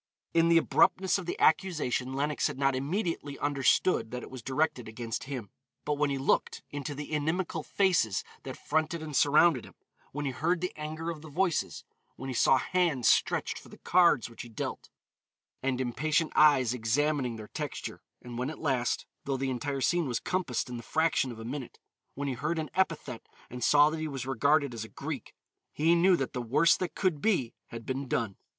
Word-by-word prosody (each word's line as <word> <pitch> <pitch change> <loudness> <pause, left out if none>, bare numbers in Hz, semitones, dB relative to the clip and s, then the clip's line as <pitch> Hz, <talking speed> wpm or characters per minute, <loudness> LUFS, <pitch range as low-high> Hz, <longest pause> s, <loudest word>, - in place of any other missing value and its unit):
In 165 0 +4
the 170 - +6
abruptness 185 +3 +3
of 180 - -8
the - - -3
accusation 155 -7 +2
Lenox 145 +2 0
had - - -6
not 135 -1 +2
immediately 145 0 -2
understood 140 -2 +2
that 125 +1 -5
it - - -10
was 130 -2 -8
directed 130 -1 -1
against 115 +1 -5
him, 125 -8 -6 0.3
but 150 - +1
when 145 0 +1
he 140 - -1
looked 135 - 0
into 145 0 -4
the 145 +2 -7
inimical 160 +2 -1
faces 160 - +1 0.2
that - - -7
fronted 160 +1 -1
and 150 -2 -6
surrounded 150 -2 +5
him, - - -14 0.4
when 145 +1 -4
he 135 - 0
heard 170 +7 0
the 180 +1 -3
anger 155 +2 -4
of 155 -3 -8
the 155 - -10
voices, 160 - -1 0.3
when 135 - -7
he - - -3
saw 130 +2 +4
hands 155 -6 +1
stretched - - +2
for - - -16
the - - -13
cards 175 -7 +4
which 115 - -10
he 120 - -9
dealt, 110 - -5 0.7
and 130 -1 -1
impatient 150 +6 0
eyes 140 -6 +5
examining 125 +2 0
their 110 -1 -9
texture, - - -5 0.2
and 120 -1 -7
when 130 +2 -1
at 160 - -7
last, 130 -5 0 0.2
though 135 -1 -1
the 135 0 -1
entire 135 +2 -3
scene 175 +2 +2
was 120 -3 -1
compassed 180 -10 -1
in 125 -1 -6
the - - -6
fraction 160 0 +1
of 115 - -9
a 110 - -8
minute, 130 +1 -6 0.4
when 140 +1 -3
he 135 - -1
heard 150 +7 -2
an 155 -1 -3
epithet 165 -10 -1 0.2
and 125 -1 -5
saw 145 +3 +6
that 160 - -4
he 155 - -2
was 135 -4 -5
regarded 140 +2 +2
as 115 -2 -5
a 110 - -10
Greek, - - -6 0.4
he 160 +3 +3
knew 180 +2 +5
that 135 -6 -3
the 125 - -2
worst 140 +8 +3
that 185 - -3
could 180 -7 0
be 175 - +1
had 115 -1 -9
been 135 +1 -3
done. 110 -5 -1
145 Hz, 200 wpm, -29 LUFS, 125-160 Hz, 0.7 s, the